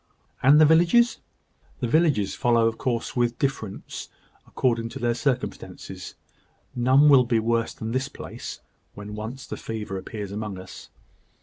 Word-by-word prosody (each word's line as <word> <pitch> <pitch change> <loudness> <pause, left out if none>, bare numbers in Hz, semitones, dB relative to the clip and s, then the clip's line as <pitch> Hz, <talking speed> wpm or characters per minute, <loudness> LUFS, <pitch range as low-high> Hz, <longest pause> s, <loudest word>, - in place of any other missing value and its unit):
"And 135 +3 +6
in - - +7
the 155 - +8
villages?" 175 +10 +4 0.6
"The 125 - -1
villages 145 - +2
follow, 120 -3 +2
of 115 0 -3
course, 120 -3 -2
with 120 -1 +1
differences 125 -8 -4 0.4
according 115 -3 0
to - - -8
their 120 0 +1
circumstances. 125 0 -4 0.6
None 130 +4 +5
will 135 -3 +7
be 120 -1 +1
worse 115 +1 0
than 110 0 -5
this 130 +3 -1
place, - - -8 0.3
when 105 +1 -8
once 110 +5 -6
the - - -6
fever 105 -4 -5
appears 100 0 -7
among 105 -1 -4
us. 95 0 -11
120 Hz, 150 wpm, -25 LUFS, 110-135 Hz, 0.6 s, the